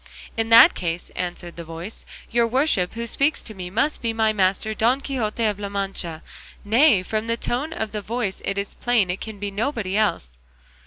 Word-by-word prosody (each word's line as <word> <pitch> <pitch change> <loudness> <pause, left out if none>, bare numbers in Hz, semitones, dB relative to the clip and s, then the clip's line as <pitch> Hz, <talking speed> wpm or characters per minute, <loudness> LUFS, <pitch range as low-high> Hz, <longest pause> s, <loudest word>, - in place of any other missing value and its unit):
"In 225 0 -1
that 230 0 +9
case," 170 0 -4
answered 175 -1 -5
the 170 - -6
voice, 165 +6 -8 0.3
"your 235 0 +3
worship 230 - +1
who 230 0 -3
speaks 280 +6 0
to 220 - -6
me 180 -3 -7
must 265 +10 +1
be 230 -1 -1
my 220 -1 +2
master 200 +2 +1
Don 235 +5 +2
Quixote 235 -5 -2
of 205 -2 0
La 200 -1 -4
Mancha; 195 -5 -3 0.4
nay, 225 -2 +5
from 215 +3 -2
the 230 0 0
tone 260 +7 -2
of 220 -9 -3
the 210 - -4
voice 215 -2 -3
it 195 - -2
is 200 0 -2
plain 225 -7 +1
it 180 - -5
can 220 -2 -6
be 200 0 -4
nobody 210 -2 -2
else." 60 - 0
215 Hz, 200 wpm, -23 LUFS, 190-230 Hz, 0.4 s, that